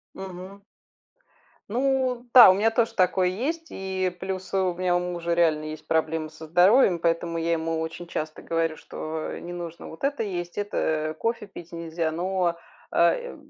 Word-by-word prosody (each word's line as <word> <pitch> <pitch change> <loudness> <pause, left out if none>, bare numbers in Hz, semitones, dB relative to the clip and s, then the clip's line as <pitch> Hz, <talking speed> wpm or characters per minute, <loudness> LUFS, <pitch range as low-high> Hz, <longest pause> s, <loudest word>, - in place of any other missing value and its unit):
Мгм. 190 +1 -9 1.1
Ну 255 +1 0
да, 245 -6 +11
у - - +5
меня 215 +4 +2
тоже 225 0 +1
такое 185 0 +3
есть. 310 - -3
И 190 -1 -2
плюс 190 -1 -5
у 190 -2 +1
меня 180 0 +1
у - - +1
мужа 175 -1 -3
реально 160 -3 +2
есть 155 0 -7
проблемы 160 0 0
со 160 - -11
здоровьем. 180 +4 +5
Поэтому 165 0 0
я 165 +1 0
ему 165 0 -1
очень 160 +2 -5
часто 155 -2 -4
говорю, 165 -1 -1
что 155 0 -5
не 175 - -8
нужно 170 -1 -7
вот 160 - -9
это 280 -3 0
есть, 175 -4 -4
это 155 -6 -1
кофе 230 +1 -2
пить 175 -3 -12
нельзя, 165 -1 -2
но, 175 +1 0 0.4
э, - - +2
175 Hz, 165 wpm, -25 LUFS, 165-195 Hz, 1.1 s, да